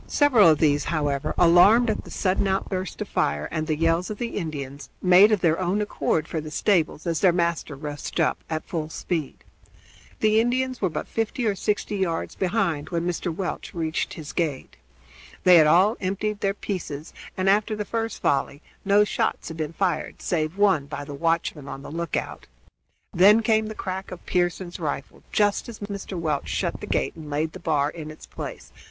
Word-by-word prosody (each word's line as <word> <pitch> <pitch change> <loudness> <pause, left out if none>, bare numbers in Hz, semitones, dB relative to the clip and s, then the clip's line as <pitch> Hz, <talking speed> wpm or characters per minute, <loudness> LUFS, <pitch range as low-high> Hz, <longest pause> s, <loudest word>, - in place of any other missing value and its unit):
Several 250 - +5
of 155 - +4
these, 145 -1 +2
however, 145 -4 -1
alarmed 180 +8 +6
at 220 - -2
the - - -11
sudden 190 +1 0
outburst 190 -1 -2
of - - -13
fire 75 +1 0
and 155 0 -2
the 155 - +1
yells 165 +2 +1
of 210 - -5
the 235 +1 -3
Indians, 140 -6 -5
made 185 +3 +6
of 210 -4 +2
their 165 0 +2
own 185 +2 0
accord 160 -6 -1
for 160 - -3
the 155 - -7
stables 165 -1 +1
as 165 -2 0
their 185 - +5
master 170 -3 -1
rushed 145 +1 -5
up - - +1
at 155 -1 -3
full 155 -3 -4
speed. 160 -3 -4 0.8
The 215 0 +4
Indians 255 +1 -1
were 190 - +2
but 160 - -4
fifty 225 +2 -2
or 210 - +2
sixty 205 +1 -1
yards 170 -4 -1
behind 180 -6 -1
when 170 -1 -1
Mr. 175 0 -2
Welch 180 +2 -5
reached 160 -1 -2
his 155 -3 -8
gate. 150 -6 -2 0.7
They 180 -1 +8
had 155 -2 +6
all 190 +8 +4
emptied 200 +2 -2
their 195 0 0
pieces, 165 -7 -5 0.2
and 185 0 0
after 210 +2 +3
the 210 0 -3
first 225 +1 -3
volley 140 +1 0 0.2
no 205 +1 +5
shots 210 - -1
had 160 - -7
been 155 -1 -3
fired 175 -1 -2
save 160 +1 -1
one 190 -9 +3
by 145 0 -6
the 145 - -7
watchman 165 -1 -1
on 135 0 -7
the - - -8
lookout. 170 0 -4 0.7
Then 210 +5 +6
came 220 -1 +2
the 220 - -6
crack 190 0 -5
of 180 -1 -10
Pearson's 175 0 -1
rifle 145 -4 -4
just 205 +2 +1
as 230 - -8
Mr. 200 -2 -6
Welch 155 -4 -1
shut - - -2
the - - -6
gate - - -1
and 155 -2 -9
laid 155 +2 -1
the 185 - -8
bar 150 -3 +1
in 155 -2 -8
its 155 - -11
place. - - -8
175 Hz, 195 wpm, -25 LUFS, 155-200 Hz, 0.8 s, They